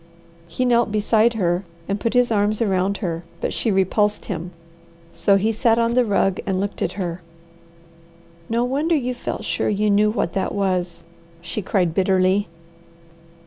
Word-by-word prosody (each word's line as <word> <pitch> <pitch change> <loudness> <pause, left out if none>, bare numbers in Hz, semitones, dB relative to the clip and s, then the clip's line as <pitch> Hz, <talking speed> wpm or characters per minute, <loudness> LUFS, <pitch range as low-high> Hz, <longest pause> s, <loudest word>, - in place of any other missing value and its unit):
He 255 - -2
knelt 235 -2 +2
beside 215 +2 +2
her 180 -3 0 0.2
and 200 +1 -2
put 230 +3 -2
his 245 -1 +3
arms 210 0 +1
around 195 -3 +1
her, 165 -1 -3 0.2
but - - -2
she 230 - -1
repulsed 205 +2 +1
him; 175 -2 -4 0.6
so 200 - +3
he 210 +3 +2
sat 225 +1 +2
on 230 0 +1
the 250 0 +4
rug 195 -3 +1
and 190 -2 0
looked 200 +1 -4
at - - -1
her. 180 -3 -4 1.3
"No 230 +1 +1
wonder 290 +7 +1
you 250 -4 -1
felt 245 - -5
sure - - -1
you 210 0 +1
knew 210 +1 +4
what 210 -6 -1
that 190 -1 -2
was!" 185 -3 -1 0.4
she 175 +5 -5
cried 180 -3 0
bitterly. 190 +1 +2
205 Hz, 165 wpm, -21 LUFS, 185-230 Hz, 1.3 s, the